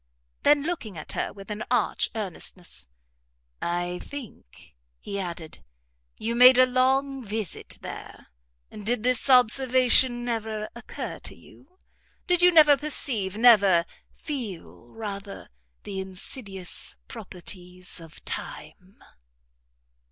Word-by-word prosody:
Then 290 -1 +5
looking 295 - -4
at 155 - -6
her - - -2
with 195 0 -10
an 210 +2 -3
arch 245 - +1
earnestness, 180 - -4 0.7
"I 175 +1 -2
think," 225 - -10 0.2
he 200 - -5
added, 170 -4 -6 0.5
"you 230 +1 -2
made 250 +1 +8
a 255 - +8
long 265 +1 +1
visit 215 -3 -4
there; - - -9 0.4
did 215 +2 -2
this 250 +1 +2
observation 250 0 +4
never 220 -2 -3
occur 235 -1 -6
to - - -5
you? 365 - -19 0.5
did 355 -1 +3
you 360 0 +7
never 305 -3 +8
perceive, 245 -9 -2
never 200 -7 +6 0.3
feel, 190 - -7
rather, 200 - -7 0.3
the 195 -2 -5
insidious 190 0 -4
properties 180 -4 -7
of 165 -1 -14
time?" 180 +5 -7
215 Hz, 110 wpm, -26 LUFS, 185-255 Hz, 0.7 s, made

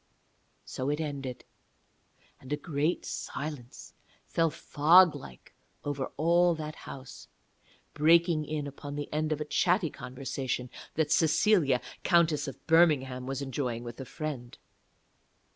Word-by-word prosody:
So 130 +2 -3
it 150 +1 -1
ended. 140 -5 -5 0.9
And 130 - -12
a 150 - +1
great 150 +2 -1
silence 140 -4 -6 0.3
fell 165 -1 +1
fog 165 +4 +5
like 65 -3 -12 0.3
over 145 -2 -2
all 170 +3 +4
that 155 -1 -5 0.2
house, 135 -1 -10 0.7
breaking 165 +1 +4
in 150 -1 -3
upon 145 0 -7
the 145 0 -5
end 155 +1 0
of 155 - 0
a 150 - -3
chatty 175 +1 +2
conversation 130 0 -4 0.2
that 155 -1 0
Cecilia, 160 - +3 0.2
Countess 160 -4 +3
of 135 - -9
Birmingham, 140 -7 +3
was 135 +1 -3
enjoying 125 -3 -3
with 120 +2 -8
a - - -6
friend. 135 -5 -6
145 Hz, 125 wpm, -29 LUFS, 135-160 Hz, 0.9 s, fog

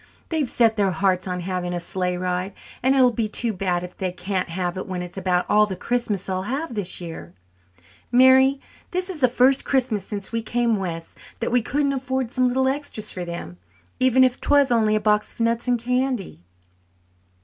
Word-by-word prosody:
They've 310 -6 0
set 225 -2 +3
their 200 -2 +3
hearts 185 +1 0
on 180 -1 -3
having 180 0 -3
a - - -2
sleigh 180 +1 -2
ride, 180 +1 -2 0.3
and 265 +2 +3
it 270 - +5
will 250 - +5
be 225 -1 -1
too 225 +2 -1
bad 180 -2 -1
if 180 - -8
they 185 -1 -2
can't 185 +1 -3
have 175 +1 -2
it 185 - -5
when 180 -2 -3
it's 175 - -9
about 180 -2 0
all 210 0 +4
the 190 - -4
Christmas 215 -4 -2
they'll 185 -1 -2
have 265 +8 -3
this 205 -4 -2
year. 160 - -8 0.8
Mary, 260 +2 +6 0.3
this 365 +1 -1
is 320 -5 -6
the 255 - +6
first 255 +2 +3
Christmas 245 -7 0
since 200 -1 -5
we 230 0 -1
came 235 0 0
west 170 -4 -6 0.2
that 230 - -2
we 245 0 +3
couldn't 280 +4 0
afford 260 -2 -2
some 255 -1 +2
little 260 +1 +1
extras 265 -6 -3
for 180 -1 -5
them, 170 - -7 0.4
even 260 0 +5
if 255 -1 +1
'twas 285 -2 +4
only 220 -2 +3
a - - +2
box 210 0 +1
of - - -24
nuts 230 +1 0
and 245 -1 +3
candy." 250 - -2
215 Hz, 205 wpm, -23 LUFS, 185-255 Hz, 0.8 s, Mary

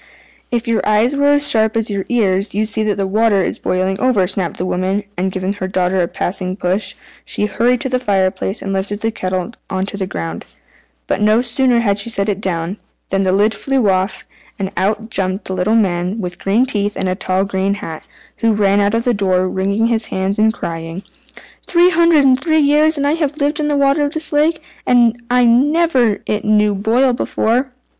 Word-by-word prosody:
"If 240 0 -2
your 230 -1 +1
eyes 215 +6 +2
were 285 0 +2
as 290 0 +5
sharp 220 0 +2
as 225 -1 -1
your 195 -1 -2
ears 200 -4 +1
you'd 215 +1 +1
see 220 0 0
that 210 -1 0
the 195 - 0
water 205 0 +2
is - - -3
boiling 185 +1 -1
over," 245 -8 +2
snapped 185 -2 -2
the 180 - -3
woman; 185 +3 -1
and 185 +2 -1
giving 190 +1 -2
her 190 -2 -4
daughter 185 0 0
a 170 - 0
passing 185 +1 -3
push, 185 +1 -1 0.3
she 210 - -1
hurried 235 +4 +1
to 265 - 0
the 255 0 0
fire 195 -6 +1
place, 195 +2 -4
and 195 - -3
lifted 205 +2 -3
the 225 - 0
kettle 185 +1 -3 0.2
on 190 -1 -2
to 200 - -5
the 190 -2 -3
ground. 85 - -6 0.6
But - - -2
no 215 +2 +4
sooner 245 0 +2
had 200 -3 +1
she 200 - -2
set 200 -2 -1
it 205 0 -2
down, 180 0 -2 0.3
than 195 0 0
the 190 -1 +1
lid 205 +3 +2
flew 265 -7 0
off, 185 +2 -2 0.3
and 195 -1 -3
out 210 +4 -1
jumped 190 -1 -2
a - - -1
little 185 +4 +1
man 185 -1 0
with 180 -3 -5
green 215 +6 +2
teeth 205 -4 -1
and 190 - -1
a 185 - 0
tall 185 +1 -1
green 195 0 -1
hat, 165 -6 -8 0.3
who 225 -1 +2
ran 200 -1 +2
out 205 +2 +1
of 230 - 0
the 245 - +1
door 185 -3 +1
wringing 200 +4 0
his 230 -1 +1
hands 190 +2 -2
and 220 +1 +4
crying 165 -2 -6 0.6
"Three 350 +1 +4
hundred 335 -3 +4
and 260 -1 +4
three 315 +2 +1
years 300 +2 +3
have 285 -1 -1
I 310 +3 +1
lived 290 0 0
in 300 - 0
the 295 -1 0
water 280 +1 +2
of 285 - -4
this 315 -1 -3
lake, 310 +2 +1 0.2
and 240 -2 +4
I 250 0 +3
never 260 -2 +2 0.2
knew 210 0 +3
it 200 -1 -4
boil 245 +4 +2
before!" 245 +2 -1
210 Hz, 215 wpm, -17 LUFS, 190-245 Hz, 0.6 s, as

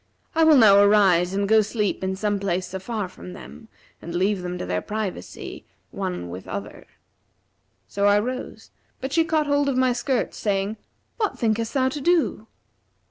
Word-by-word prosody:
I 325 - +3
will 315 -2 +7
now 205 -5 +7
arise 195 -4 +4
and 200 0 0
go 220 +1 +5
sleep 210 -2 -2
in 190 0 -1
some 205 +1 -1
place 185 -1 -2
afar 200 +1 -3
from 180 0 -11
them 220 +3 -12 0.3
and 170 +1 -7
leave 190 +2 +1
them 180 0 -4
to - - -5
their 90 0 -2
privacy, 210 - -6 0.3
one 90 -1 -4
with 90 +2 -8
other.' 100 +1 -7 1.0
So 200 0 0
I 205 0 +5
rose, 255 +5 -4 0.3
but 265 +1 -5
she 330 - +4
caught 315 -2 +1
hold 285 0 +1
of 260 - -1
my 255 -1 +3
skirts, 255 +1 -1
saying, 200 +1 -1 0.4
'What 425 -3 -1
thinkest 225 +1 -1
thou 260 -1 +3
to 290 +2 -5
do?' 325 -9 +1
210 Hz, 175 wpm, -24 LUFS, 190-255 Hz, 1.0 s, will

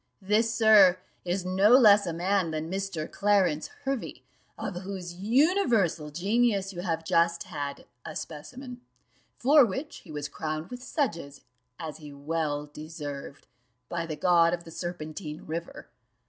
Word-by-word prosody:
This, 215 +4 +2
sir, 215 -5 +6 0.3
is 180 +1 -2
no 190 +3 +3
less 205 -5 +6
a - - -1
man 180 +1 0
than 160 +1 -4
Mr. 190 -5 -3
Clarence 195 -7 +1 0.2
Hervey, 270 -2 -4 0.3
of 185 - -4
whose 185 -2 -6
universal 225 - +2
genius 200 +4 +1
you 175 - -5
have 165 -3 -2
just 170 +1 +2
had 145 -5 -6 0.2
a 155 - -8
specimen; 245 - -8 0.6
for 285 +3 +6
which 250 +7 -3
he 170 - -13
was 145 -1 -4
crowned 155 +4 -5
with 250 0 -7
sedges, 170 - -3 0.4
as 160 -2 -6
he 150 -2 -11
well 145 0 -2
deserved, 145 -2 -8 0.4
by 165 -1 -3
the 155 - -4
god 170 +1 +4
of 170 - -13
the 165 - -12
Serpentine 155 -2 -6
river. 165 +2 -6
175 Hz, 145 wpm, -28 LUFS, 155-205 Hz, 0.6 s, sir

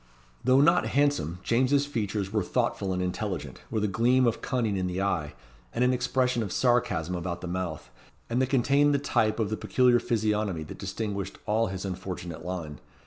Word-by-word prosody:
Though 130 +2 +5
not 170 +4 +4
handsome, 140 - +1
James's 130 +4 +2
features 105 -7 -3
were 105 - +2
thoughtful 95 +1 -1
and 90 0 -1
intelligent, 90 -6 -4
with 110 -2 -1
a - - +2
gleam 120 +6 +3
of 115 - 0
cunning 115 -6 0
in 95 -1 -1
the 90 +1 -3
eye, 85 -7 -1 0.4
and 125 - +2
an 125 0 +3
expression 125 -1 +1
of 100 -4 -3
sarcasm 120 -10 +1
about 85 0 -3
the 90 - -5
mouth, 85 -7 -4 0.4
and 120 +2 0
they 130 - +2
contained 140 +3 +3
the - - +4
type 110 -6 +1
of 110 -2 0
the 110 - -1
peculiar 125 -1 +3
physiognomy 105 -7 0
that 75 - -10
distinguished 100 -1 -4
all 110 +2 +2
his 95 0 -5
unfortunate 90 -3 -5
line. 85 -4 -5
105 Hz, 185 wpm, -28 LUFS, 90-125 Hz, 0.4 s, Though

